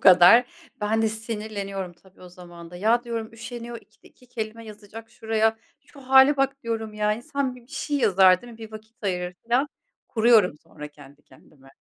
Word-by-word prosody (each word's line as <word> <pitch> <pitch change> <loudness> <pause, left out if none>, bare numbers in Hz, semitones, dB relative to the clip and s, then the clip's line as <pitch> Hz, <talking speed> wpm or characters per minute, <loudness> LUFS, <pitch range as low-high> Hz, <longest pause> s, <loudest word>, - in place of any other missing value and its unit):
kadar? 185 +6 +8 0.4
Ben 220 +2 +1
de 220 - +2
sinirleniyorum, 210 -4 -5
tabii, 185 +2 -24
o 180 - -11
zaman 175 -1 -13
da. 175 - -10
Ya, 225 +6 +2
diyorum, 230 -2 -5
"Üşeniyor, 235 +1 -8
ikide - - -23
iki 250 - -24
kelime 230 -1 -6
yazacak 215 +1 -12
şuraya. 220 -1 0 0.2
Şu 280 - -18
hâle 265 +2 +6
bak!" 275 0 -1
diyorum 225 -2 -4
ya. 210 0 +1
"İnsan 255 +3 -3
bir, 245 - -15
bir 260 +6 -21
şey 290 - -2
yazar 185 -5 +5
değil 240 -1 -11
mi? 225 - -15
Bir 220 -1 -10
vakit 220 +2 -13
ayırır." 180 -2 -2
filan. 245 +5 +1 0.4
Kuruyorum 220 -5 +4
sonra 150 0 -10
kendi 145 0 -17
kendime. 135 -3 -21
220 Hz, 185 wpm, -24 LUFS, 190-235 Hz, 0.4 s, kadar